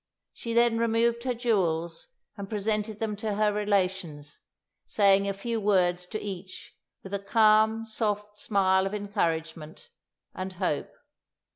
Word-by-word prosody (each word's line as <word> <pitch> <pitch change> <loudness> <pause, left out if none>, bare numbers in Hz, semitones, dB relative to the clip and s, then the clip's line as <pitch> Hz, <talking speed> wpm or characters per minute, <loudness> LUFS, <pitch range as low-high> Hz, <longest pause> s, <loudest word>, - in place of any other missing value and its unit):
She 230 - -5
then 235 -1 +3
removed 230 +1 +1
her 255 - +1
jewels 170 -9 0 0.3
and 200 -2 -7
presented 210 0 -2
them 220 -2 -2
to 210 0 -2
her 210 0 +2
relations, 185 -7 -1 0.5
saying 200 -1 +3
a - - +1
few 225 +3 -3
words 180 -3 +2
to 215 +3 -4
each 190 -2 -8 0.3
with 195 - -9
a 200 - 0
calm, 220 +2 +3
soft 210 -2 -3
smile 190 -2 +2
of 200 - -4
encouragement 165 - -3 0.4
and 185 0 -5
hope. 180 -5 -2
205 Hz, 135 wpm, -27 LUFS, 185-220 Hz, 0.5 s, then